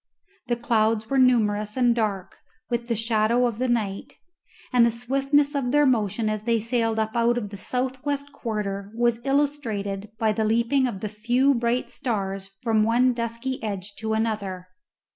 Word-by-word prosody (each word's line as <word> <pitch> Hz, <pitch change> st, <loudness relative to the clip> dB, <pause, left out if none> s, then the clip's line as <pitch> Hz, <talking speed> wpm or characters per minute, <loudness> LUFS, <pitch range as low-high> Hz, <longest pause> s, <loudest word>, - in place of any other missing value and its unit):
The 240 Hz, -, +1 dB
clouds 225 Hz, -1 st, +1 dB
were 270 Hz, -, +3 dB
numerous 215 Hz, -4 st, +2 dB
and 245 Hz, -2 st, +4 dB
dark 210 Hz, -5 st, -2 dB, 0.3 s
with 235 Hz, 0 st, -1 dB
the 235 Hz, -, 0 dB
shadow 225 Hz, +2 st, +2 dB
of 235 Hz, -2 st, -2 dB
the 255 Hz, -, +1 dB
night; 215 Hz, -5 st, -2 dB, 0.6 s
and 245 Hz, -1 st, +6 dB
the 235 Hz, -, +5 dB
swiftness 275 Hz, +5 st, +1 dB
of 275 Hz, -4 st, -1 dB
their 295 Hz, +3 st, +4 dB
motion 225 Hz, -3 st, +1 dB
as 215 Hz, 0 st, -2 dB
they 230 Hz, -1 st, +2 dB
sailed 230 Hz, 0 st, 0 dB
up 220 Hz, 0 st, -1 dB
out 235 Hz, +1 st, +2 dB
of 210 Hz, -4 st, -3 dB
the 200 Hz, -, -8 dB
south 255 Hz, +5 st, -3 dB
west 285 Hz, 0 st, -3 dB
quarter 205 Hz, -5 st, -4 dB
was 235 Hz, 0 st, +1 dB
illustrated 230 Hz, -9 st, -1 dB
by 220 Hz, -1 st, +2 dB
the 220 Hz, +1 st, -1 dB
leaping 235 Hz, +5 st, +2 dB
of 200 Hz, -6 st, -5 dB
the 215 Hz, -, -2 dB
few 240 Hz, +6 st, +2 dB
bright 235 Hz, 0 st, -1 dB
stars 195 Hz, -5 st, -3 dB
from 225 Hz, -2 st, +2 dB
one 240 Hz, +3 st, +3 dB
dusky 235 Hz, +2 st, -3 dB
edge 205 Hz, -2 st, -5 dB
to 220 Hz, 0 st, -2 dB
another. 200 Hz, -5 st, -2 dB
230 Hz, 175 wpm, -25 LUFS, 215-250 Hz, 0.6 s, and